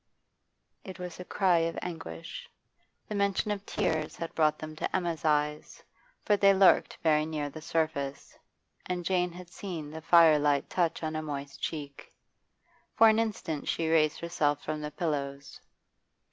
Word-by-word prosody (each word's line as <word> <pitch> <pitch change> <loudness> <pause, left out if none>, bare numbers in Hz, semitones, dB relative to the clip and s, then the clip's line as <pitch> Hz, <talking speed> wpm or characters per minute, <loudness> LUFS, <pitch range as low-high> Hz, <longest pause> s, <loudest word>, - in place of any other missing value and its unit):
It 185 -2 -9
was 180 -1 -7
a - - -5
cry 180 -2 +2
of 165 0 -1
anguish. 80 - -7 0.6
The - - -5
mention 200 +1 0
of 200 -1 -3
tears 160 -6 -1
had 165 - -6
brought 155 -1 +2
them 155 0 -8
to - - -2
Emma's 170 -5 -2
eyes, 150 -1 0 0.4
for 210 - +4
they 200 -1 +5
lurked 190 0 +4
very 155 -2 +4
near 150 -2 -3
the 155 - -9
surface, 155 -4 -2 0.5
and 180 -1 -3
Jane 180 -1 +1
had 175 0 -11
seen 165 -8 -6
the 160 +1 -7
firelight 150 -4 +4
touch 170 -2 0
on 155 0 -2
a 155 - -1
moist 140 -2 -6
cheek. 145 -3 -6 0.8
For 225 - +7
an 220 0 +3
instant 200 -9 -3
she 165 -1 0
raised 155 -2 +3
herself 155 -4 0
from 155 0 -3
the 150 - -4
pillows. 140 -3 -4
160 Hz, 160 wpm, -29 LUFS, 150-180 Hz, 0.8 s, For